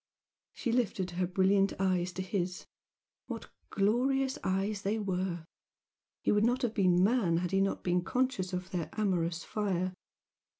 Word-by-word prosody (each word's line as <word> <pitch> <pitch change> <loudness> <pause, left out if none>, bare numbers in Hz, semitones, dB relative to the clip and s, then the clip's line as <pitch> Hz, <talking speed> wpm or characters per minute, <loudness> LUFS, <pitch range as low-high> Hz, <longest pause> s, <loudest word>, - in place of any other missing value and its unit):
She 240 - -2
lifted 200 -6 0
her 180 +1 -1
brilliant 195 +1 +3
eyes 185 -2 +1
to 185 - -3
his 180 -1 -2 0.6
what - - -6 0.2
glorious 260 +6 +1
eyes 195 +2 0
they 210 +2 0
were! 185 -4 -2 0.8
He - - +3
would 210 0 +3
not 245 +3 +2
have 235 -3 0
been 185 -4 +4
man 200 -6 +3
had 175 +1 -1
he 195 0 +3
not 195 - 0
been 180 0 +1
conscious 250 -6 0
of 180 0 -4
their 170 -4 -2
amorous 175 -5 0
fire. 185 -3 -1
190 Hz, 155 wpm, -31 LUFS, 180-215 Hz, 0.8 s, been